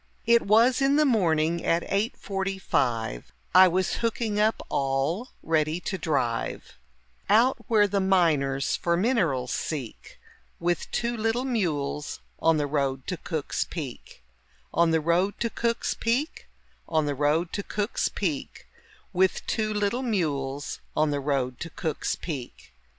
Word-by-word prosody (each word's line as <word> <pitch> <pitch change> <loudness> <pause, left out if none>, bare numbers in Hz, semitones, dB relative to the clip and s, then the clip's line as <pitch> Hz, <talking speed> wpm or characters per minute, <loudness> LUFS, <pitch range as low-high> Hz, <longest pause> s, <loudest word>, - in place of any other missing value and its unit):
It 235 0 +5
was 230 +6 +4
in 275 +1 +4
the 305 0 +4
morning 170 - +2
at 170 +1 +2
eight 205 +3 0
forty 195 -1 -3
five, 115 - -1 0.2
I 185 +1 +9
was 185 +1 0
hooking 225 -2 -1
up 215 +1 +1
all 140 - 0 0.2
ready 155 +1 +1
to 195 - -3
drive 135 -10 -2 0.5
Out 235 +6 +5
where 215 -4 +4
the 200 0 0
miners 155 -8 +2
for 170 0 0
minerals 175 - +1
seek, 135 -8 -5 0.4
With 175 0 -1
two 240 0 -1
little 225 +3 0
mules 155 - -2 0.2
on 165 -1 +3
the 145 - 0
road 135 -2 -1
to 180 - -3
Cook's 160 -3 -2
Peak 135 - -8 0.5
On 170 - +4
the 160 0 +3
road 170 +5 +1
to 230 -1 -1
Cook's 235 +1 -1
Peak, 250 +7 -1 0.4
On 155 -2 +2
the 145 - 0
road 150 +5 +1
to 200 - -1
Cook's 205 +1 -1
Peak, 160 -9 -3 0.5
With 185 +1 +2
two 215 -2 -1
little 210 +4 0
mules 145 - -2 0.2
on 155 -1 +3
the 145 - 0
road 135 -3 -1
to 165 - -5
Cook's 160 -2 -2
Peak. 135 - -7
170 Hz, 145 wpm, -26 LUFS, 145-215 Hz, 0.5 s, I